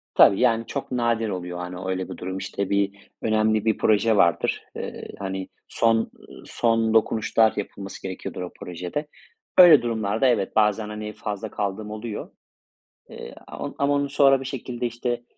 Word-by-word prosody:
Tabii 100 - +7
yani 115 -2 +2
çok 140 - -5
nadir 115 -3 0
oluyor, 90 -2 -4
hani, 90 0 -6
öyle 95 -1 -2
bir - - -7
durum. 95 +1 -5
İşte, 100 0 -3
bir 100 0 -1
önemli 110 -1 +2
bir 110 - +2
proje 110 +1 +3
vardır. 85 -4 +2
Eee, - - -6
hani, 95 -1 -4 0.2
son, 115 0 +2
ııı, 115 - -7
son 115 -1 +1
dokunuşlar 110 0 +3
yapılması 100 -1 -6
gerekiyordur 95 -1 -6
o 90 - -5
projede. 90 - -5 0.5
Öyle 175 -5 +9
durumlarda 115 +1 0
evet 110 -6 +1
bazen, 105 0 +2
hani, 105 0 -6
fazla 105 0 -5
kaldığım 105 +1 -3
oluyor. 110 0 -6 0.8
Eee, - - -9
am - - -6
ama 140 0 +2
onu 140 0 0
sonra 135 -1 +4
bir - - -6
şekilde, 125 -2 -4
işte, 120 +1 -3
110 Hz, 160 wpm, -24 LUFS, 100-120 Hz, 0.8 s, Öyle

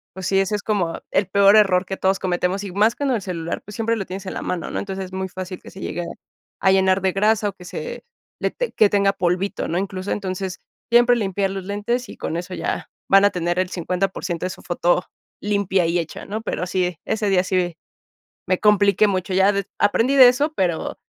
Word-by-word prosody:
pues 190 -1 -6
sí, 195 - +3
ese 195 +2 +1
es 205 - -4
como 190 -6 -1
el 195 - +2
peor 200 +1 +5
error 195 -3 +4
que 190 +1 -5
todos 190 0 +2
cometemos. 180 +2 -1
Y 195 - -6
más 215 +4 +3
con 280 +1 -1
el 235 -4 0
celular, 170 -3 -4
pues 210 - -10
siempre 230 +2 0
lo 195 - -3
tienes 190 +2 -7
en - - -4
la - - -4
mano, 175 -3 -3
¿no? - - -2
Entonces, 195 -1 -4
es 185 - -16
muy 190 0 -3
fácil 185 0 -7
que - - -12
se 190 - -12
llegue 175 - -3 0.6
a 190 - +5
llenar 190 0 +3
de 190 0 +2
grasa 210 +1 +2
o - - -8
que 180 -2 -14
se 480 - -6 0.4
le - - +1
ten - - -3
que 215 - +5
tenga 200 -1 +2
polvito, 185 +1 -1
¿no? 170 - -1
Incluso, 190 0 -3
entonces, 190 -1 -3 0.3
siempre 240 +1 +6
limpiar 195 -2 -1
los 195 -1 -5
lentes 210 +4 -2
y - - -10
con - - -4
eso 180 +2 -6
ya, - - -3 0.2
van 195 +1 +6
a - - +6
tener 175 0 -1
el 185 -1 0
50% 180 -1 -2
de - - -5
su - - -10
foto 175 +1 +1 0.4
limpia 200 -3 +1
y 170 +1 +1
hecha, 165 -1 -6
¿no? 215 +2 -4
Pero 205 -4 -3
sí, 180 -2 -1
ese 220 -2 0
día 185 -2 +3
sí, 180 -3 -1 0.7
me 185 0 +1
compliqué 210 0 +4
mucho. 185 -1 -1
Ya 190 +2 +4
des 200 -1 -2
aprendí 230 +6 +3
de 260 -2 +9
eso, 290 +5 0
pero 175 -4 -1
195 Hz, 225 wpm, -22 LUFS, 180-205 Hz, 0.7 s, de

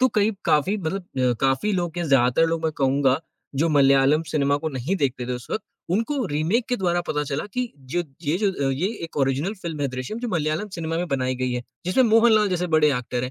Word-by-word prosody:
तो 260 - +5
कहीं 210 -2 +2
काफ़ी 155 +8 +2
मतलब 190 +2 -3
अ, 130 -7 0
काफ़ी 135 +10 +1
लोग 175 -2 -2
या 175 - -1
ज़्यादातर 135 +1 +3
लोग 165 0 -1
मैं 160 - +1
कहूँगा, 135 -1 +3 0.4
जो 155 +5 +2
मलयालम 140 +1 +4
सिनेमा 140 -2 +2
को 160 +2 -3
नहीं 140 +7 -2
देखते 130 -5 -1
थे 125 - -2
उस 125 0 -6
वक़्त, 220 - -2 0.3
उनको 230 +7 0
रीमेक 165 +10 0
के 250 - +1
द्वारा 175 -3 +1
पता 150 -1 -1
चला 140 +1 -3
कि 250 -2 -2
जो 135 +6 -3 0.2
ये 155 +3 0
जो 185 -10 0
ये 145 +8 0 0.2
एक 165 - -10
ओरिजिनल 140 +8 0
फ़िल्म 165 -3 -4
है 140 - +1
दृश्यम 130 - -5
जो 240 0 -3
मलयालम 160 +1 -1
सिनेमा 165 -1 -3
में 175 - -1
बनाई 130 -2 0
गई 125 0 -2
है। 125 0 -2 0.2
जिसमें 185 +8 +3
मोहनलाल 220 -2 +5
जैसे 180 -1 -1
बड़े 150 -1 +5
एक्टर 125 0 -3
हैं। 125 - -4
155 Hz, 225 wpm, -23 LUFS, 135-185 Hz, 0.4 s, तो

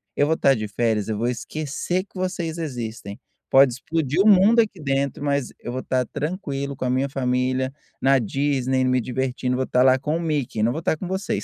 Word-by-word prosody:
eu 145 - +3
vou 160 - +2
estar 135 -3 +3
de 110 -1 -3
férias, 110 0 0
eu 105 - -1
vou 120 +2 0
esquecer 155 +8 -3
que 200 - -16
vocês 175 -3 -3
existem. 115 -9 -5 0.3
Pode 135 -2 +6
explodir 155 +5 -1
o 215 - +4
mundo 210 +4 +6
aqui 205 -6 -4
dentro, 140 0 -1
mas 140 -2 0
eu 120 - -6
vou 130 +1 -3
estar 130 -1 0
tranquilo 140 -4 -4
com 130 - -4
a - - 0
minha 130 +2 +1
família, 130 0 0 0.3
na 135 0 +4
Disney, 130 +1 0
me 130 -1 +2
divertindo. 125 +1 -2
Vou 130 - 0
estar 125 0 +2
lá 130 0 +5
com 150 +3 -1
o - - -4
Mickey, 145 -9 -1
não 115 - +3
vou 160 - -3
estar 160 -1 0
com 185 - -6
vocês". 190 +2 -2
135 Hz, 215 wpm, -23 LUFS, 125-160 Hz, 0.3 s, Pode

